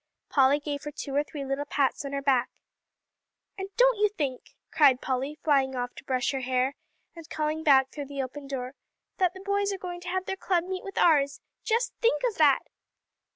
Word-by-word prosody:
Polly 275 +1 +4
gave 290 -1 -4
her 295 - -4
two 285 -2 -6
or 290 - +3
three 290 -1 -7
little 275 +1 -2
pats 280 -1 0
on 275 - -4
her 280 0 -3
back. 265 -3 +2 1.1
"And 385 -1 -6
don't - - +4
you 420 0 +4
think," 285 -11 -4 0.2
cried 275 -5 +5
Polly, 265 +4 -2
flying 270 -3 +2
off 245 0 -3
to - - -12
brush 255 -2 0
her 270 - -2
hair, 255 +1 0 0.4
and 330 -1 -11
calling 310 0 -2
back 270 -3 +5
through 290 -2 -6
the 280 -1 -3
open 275 +2 -8
door, 260 -1 -4 0.4
"that 365 -1 +1
the 375 - -9
boys 400 0 0
are 390 - -3
going 355 -1 -6
to 360 - -6
have 375 +1 -1
their 385 - -3
club 360 -3 +1
meet 370 +1 -5
with 390 -1 -8
ours. 285 -4 +3 0.2
Just 465 +2 0
think 475 +2 +2
of 455 - -4
that!" 285 -4 +5
290 Hz, 205 wpm, -27 LUFS, 270-365 Hz, 1.1 s, cried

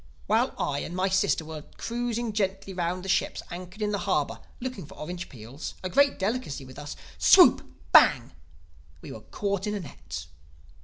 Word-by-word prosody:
While - - +2
I 140 -1 -1
and 175 - -5
my 185 +1 +1
sister 190 -4 +2
were 155 -1 -7 0.2
cruising 235 -1 -2
gently 195 -2 -1
round 180 +1 -2
the - - -5
ships - - 0
anchored 180 +4 -6
in 210 - 0
the 205 - -1
harbor - - +1 0.2
looking 245 - -5
for - - -13
orange 175 +3 -6
peels, 125 +4 -8
a 185 - -3
great 280 +4 +4
delicacy 195 - -2
with 130 +2 -11
us—Swoop! 145 0 +5 0.3
Bang!—we 75 +1 +2
were 110 - -8
caught 200 - -2
in 210 - -1
a - - -2
net. 80 - -8
180 Hz, 165 wpm, -27 LUFS, 140-205 Hz, 0.3 s, us—Swoop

